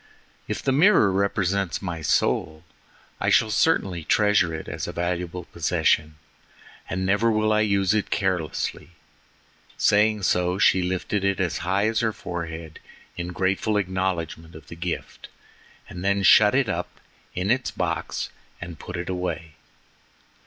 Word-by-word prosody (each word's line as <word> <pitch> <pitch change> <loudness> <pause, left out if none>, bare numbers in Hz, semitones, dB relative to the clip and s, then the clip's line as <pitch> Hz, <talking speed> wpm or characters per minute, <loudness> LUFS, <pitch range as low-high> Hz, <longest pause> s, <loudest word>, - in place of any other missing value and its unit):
"If - - -4
the 135 - +1
mirror 145 - +5
represents 100 -1 0
my 85 -4 -5
soul, 80 +1 0 0.6
I - - +1
shall 110 -1 +3
certainly 95 - +1
treasure 105 -2 +3
it 80 0 -6
as - - -5
a - - -4
valuable 90 0 -3
possession, 80 -2 0 0.7
and 95 +1 -2
never 100 +4 +2
will 110 0 +2
I 105 - +3
use 100 -2 +2
it 105 -1 0
carelessly." 90 -2 -2 0.8
Saying 105 0 +3
so, 90 0 +1
she 95 -2 +4
lifted 95 +2 -2
it 100 -1 +1
as 90 -3 -1
high 95 +3 0
as 110 0 0
her 110 -2 0
forehead, 80 -3 -6 0.4
in 85 0 -4
grateful 95 +4 0
acknowledgment 95 -4 -3
of 80 - -13
the - - -8
gift, 85 +1 -5 0.6
and 90 0 -8
then 100 0 +1
shut 105 +4 +6
it 135 -2 +2
up 90 -3 -4 0.4
in 90 +4 0
its 125 +1 +1
box - - -3 0.3
and 85 -3 -8
put 90 - -7
it 85 - -5
away. 85 -4 -4
95 Hz, 145 wpm, -24 LUFS, 85-105 Hz, 0.8 s, shut